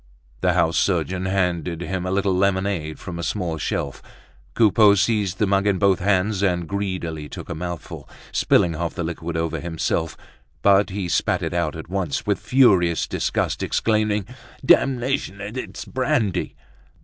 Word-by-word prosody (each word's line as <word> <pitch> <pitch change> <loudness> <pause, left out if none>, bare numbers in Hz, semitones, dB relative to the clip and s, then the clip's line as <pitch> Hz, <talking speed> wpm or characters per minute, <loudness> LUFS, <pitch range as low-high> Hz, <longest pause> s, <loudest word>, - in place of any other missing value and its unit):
The - - +2
house 80 +1 +2
surgeon 95 0 0
handed 90 -3 -1
him 90 0 -3
a - - -2
little 100 0 +1
lemonade 95 -5 0
from 85 -2 -7
a - - -2
small 85 -6 -2
shelf; - - -3 0.5
Coupeau 105 -2 +5
seized 100 -2 +1
the 105 - +2
mug 100 +1 +1
in 100 -2 +2
both 100 -1 +3
hands 100 +1 +1
and 90 -4 0
greedily 90 -6 -3
took - - -9
a - - -2
mouthful, 85 +1 -6 0.2
spilling 85 - +3
half 85 +1 -3
the 90 - -2
liquid 85 0 -4
over 80 0 -1
himself; 80 -1 -2 0.5
but 100 +1 +5
he 95 -1 -3
spat - - 0
it - - -2
out 85 -3 -1
at 80 - -8
once 90 -5 -2
with - - 0
furious 95 -11 +3
disgust, - - -1
exclaiming: 105 -2 +1 0.4
"Damnation! 130 -7 +2
It's 105 +6 -6
brandy!" 130 - -1
95 Hz, 155 wpm, -22 LUFS, 85-100 Hz, 0.5 s, Coupeau